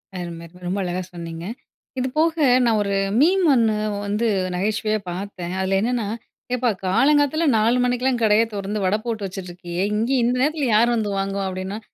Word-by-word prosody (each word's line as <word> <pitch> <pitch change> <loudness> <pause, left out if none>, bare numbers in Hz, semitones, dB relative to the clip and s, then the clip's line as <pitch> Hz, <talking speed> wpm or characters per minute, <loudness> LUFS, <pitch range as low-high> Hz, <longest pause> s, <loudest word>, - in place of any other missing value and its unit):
அரும! 170 -2 -6 0.2
ரொம்ப 190 +3 -1
அழகா 180 +1 -2
சொன்னீங்க. 165 0 -7 0.5
இது 255 - 0
போக 325 +1 +3 0.3
நான் 220 -2 +3
ஒரு 200 -1 -1 0.2
மீம் 365 +4 +4
ஒண்ணு 225 -3 +3 0.3
வந்து 210 +3 0 0.3
நகைச்சுவையா 215 +2 0
பார்த்தேன். 180 -1 -5
அதில 190 +1 +1
என்னன்னா, 235 -2 -1 0.5
"ஏப்பா 245 -1 +1 0.2
காலங்காத்த 290 - +3
நாலு 230 +3 +3
மணிக்கெல்லாம் 250 0 0
கடைய 215 +1 +5
திறந்து 200 0 -3
வட 200 +3 +2
போட்டு 220 -4 -3
வச்சுட்ருக்கியே 180 -1 -5
இங்கே 235 +5 +1
இந்த 245 +2 +2
நேரத்தில 295 -1 +1
யார் 240 +2 +4
வந்து 210 -3 -1
வாங்குவா?" 195 0 -2
அப்டின்னா 190 +3 -5
215 Hz, 155 wpm, -22 LUFS, 190-245 Hz, 0.5 s, கடைய